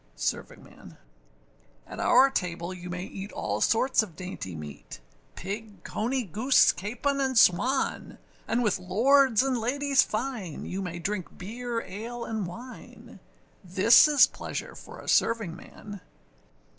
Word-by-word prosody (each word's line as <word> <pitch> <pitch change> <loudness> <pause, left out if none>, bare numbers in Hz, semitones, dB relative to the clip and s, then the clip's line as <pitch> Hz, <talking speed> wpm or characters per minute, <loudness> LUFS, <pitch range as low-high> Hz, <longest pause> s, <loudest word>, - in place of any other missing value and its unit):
SERVINGMAN. - - -6 0.9
At - - -9
our 270 +1 +5
table 175 -4 -3
you 180 -1 -9
may 180 +1 -4
eat 195 +1 -8
all - - -3
sorts 255 +3 +3
of 195 -7 -8
dainty 180 - -7
meat, 75 -5 -9 0.4
Pig, 205 +2 -7
cony, 250 +4 -2
goose, 225 - +4
capon, 275 +8 -2
and 260 -2 0
swan; 225 +8 +2 0.3
And 240 +2 0
with 210 -5 +1
lords 240 +6 +3
and 260 -3 0
ladies 275 +4 +2
fine, 215 - -4
you 190 +2 -4
may 175 -2 -5
drink 185 +1 -4
beer, 230 +4 -4
ale, 230 +5 -7
and 220 -4 -3
wine! 240 +8 -11 0.4
This 190 - +6
is 295 -2 +6
pleasure - - -7
for - - -12
a - - -12
servingman. 205 -1 -1
215 Hz, 130 wpm, -27 LUFS, 185-250 Hz, 0.9 s, This